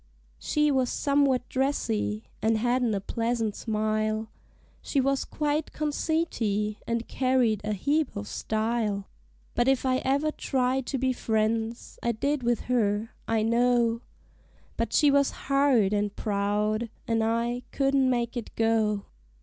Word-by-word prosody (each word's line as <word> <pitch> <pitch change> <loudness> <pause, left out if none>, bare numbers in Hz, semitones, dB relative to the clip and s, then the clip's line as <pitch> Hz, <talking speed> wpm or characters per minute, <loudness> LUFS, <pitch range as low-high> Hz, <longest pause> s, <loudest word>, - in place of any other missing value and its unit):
She 300 0 +1
was 260 -3 +2
somewhat 280 -3 +2
dressy, 110 - -1 0.2
an' 225 +1 +2
hadn't 240 0 +1
a - - 0
pleasant 230 0 -1
smile 215 0 -1 0.5
She 280 - 0
was 275 +1 +1
quite 300 0 -2
conceity, 285 -9 -1
and 230 0 -1
carried 255 -5 +1
a 210 0 -1
heap 285 +6 0
o' 205 - -3
style; 215 -1 -2 0.5
But 240 +1 +1
if 270 0 +2
I 255 0 +2
ever 280 +4 +1
tried 260 -2 -1
to 275 - -1
be 260 0 +1
friends, 225 0 -1
I 235 - 0
did 280 +5 -1
with 240 -1 +1
her, 220 -3 0 0.2
I 225 -1 +1
know; 235 0 +2 0.7
But 230 -1 -2
she 295 -2 +4
was 280 0 +4 0.2
hard 275 -7 +3
and 205 0 0
proud, 210 +2 0 0.2
an' 225 -1 +1
I 235 +2 0
couldn't 275 -1 +2
make 240 -1 0
it 240 -3 -6
go. 220 -2 +1
235 Hz, 140 wpm, -27 LUFS, 215-265 Hz, 0.7 s, she